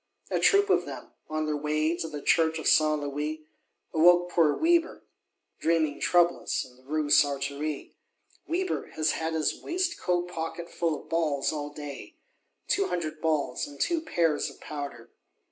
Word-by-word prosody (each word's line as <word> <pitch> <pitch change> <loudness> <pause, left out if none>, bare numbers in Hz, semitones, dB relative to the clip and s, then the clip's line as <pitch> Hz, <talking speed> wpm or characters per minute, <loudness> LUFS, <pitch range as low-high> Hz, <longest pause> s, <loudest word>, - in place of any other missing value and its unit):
A - - +1
troop 405 0 +4
of - - +2
them, - - -8 0.2
on 155 0 -1
their 155 -1 -1
way 155 +2 0
to 165 - -4
the 150 -2 -7
Church 160 -1 +3
of 160 - -6
Saint 155 -1 +4
Louis, 150 +2 -4 0.5
awoke 175 +2 +5
poor 160 -4 +3
Weber, 335 +1 +2 0.6
dreaming 160 -3 +1
troublous, 175 -1 +2
in 125 - -17
the 130 - -22
Rue 145 +2 -2
Sartory. 145 +1 +1 0.5
Weber 365 +3 -1
has 155 0 +2
had 160 0 -2
his 155 -1 0
waistcoat 340 - -1
pocket 170 0 -5
full 165 -3 -1
of - - -16
balls 155 -4 0
all 145 -1 -4
day; 145 - -8 0.5
"two 395 - +1
hundred 155 -3 -3
balls, 155 -3 0
and 145 -1 -12
two 340 -2 +1
pears 165 - +1
of - - -15
powder!" 140 -6 -7
155 Hz, 160 wpm, -28 LUFS, 150-175 Hz, 0.6 s, awoke